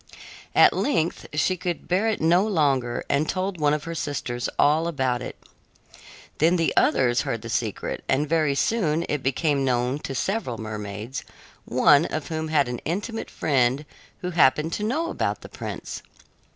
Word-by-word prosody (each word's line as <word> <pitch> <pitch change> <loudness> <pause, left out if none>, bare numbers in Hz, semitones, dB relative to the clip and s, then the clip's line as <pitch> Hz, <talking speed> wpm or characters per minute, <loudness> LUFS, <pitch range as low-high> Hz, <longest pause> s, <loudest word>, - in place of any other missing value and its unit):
At - - +7
length 170 - 0
she 170 +5 +1
could 180 -1 -4
bear 190 +5 +1
it 220 - 0
no 170 +4 +4
longer 140 - +1
and 145 +3 +1
told 185 -1 -2
one 145 -1 +4
of 150 - -5
her 165 - -5
sisters 130 -6 -3
all 155 +3 +3
about 130 -6 0
it. - - -7 1.0
Then 165 +4 +4
the 165 -2 +1
others 120 -2 +3
heard 115 -1 -3
the 115 - -6
secret, 110 -2 -2
and 145 +3 +2
very 155 -2 +2
soon 170 -3 +1
it 150 -2 -1
became 140 +2 +1
known 125 +1 0
to 135 - -5
several 190 - -2
mermaids, 110 +2 -6 0.4
one 140 +5 +5
of 155 -1 -4
whom 160 -1 -2
had 150 -4 +2
an 125 -1 -4
intimate 210 +7 -4
friend 135 -1 +1 0.4
who 180 - -3
happened 160 0 +3
to 210 - -2
know 315 +10 -1
about - - -2
the - - -10
prince. - - -6
150 Hz, 165 wpm, -24 LUFS, 130-170 Hz, 1.0 s, At